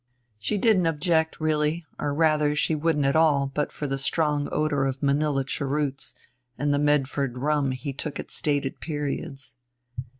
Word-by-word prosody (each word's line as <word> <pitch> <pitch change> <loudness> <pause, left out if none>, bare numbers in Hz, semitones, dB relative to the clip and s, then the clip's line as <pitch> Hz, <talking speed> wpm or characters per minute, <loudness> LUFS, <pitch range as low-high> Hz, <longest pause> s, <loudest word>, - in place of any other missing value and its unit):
She 210 - -1
didn't 195 -4 +3
object, 160 0 +1
really, 155 +1 0
or 145 - -1
rather 150 -1 +2
she 155 - +1
wouldn't 150 -2 +1
at 135 - +2
all 145 -4 +3
but 150 +1 -1
for 150 - -5
a 135 -1 -2
strong 150 0 0
odor 150 -3 +1
of 135 +1 -4
Manilla 140 0 +2
cheroots 135 -3 -2 0.4
and 145 0 +1
the 145 - +2
Medford 140 -3 +1
rum 145 +1 +1
he 130 +2 -4
took 145 +2 -5
at - - -7
stated 145 -2 -1
periods. 140 -4 -4
145 Hz, 160 wpm, -26 LUFS, 140-155 Hz, 0.4 s, didn't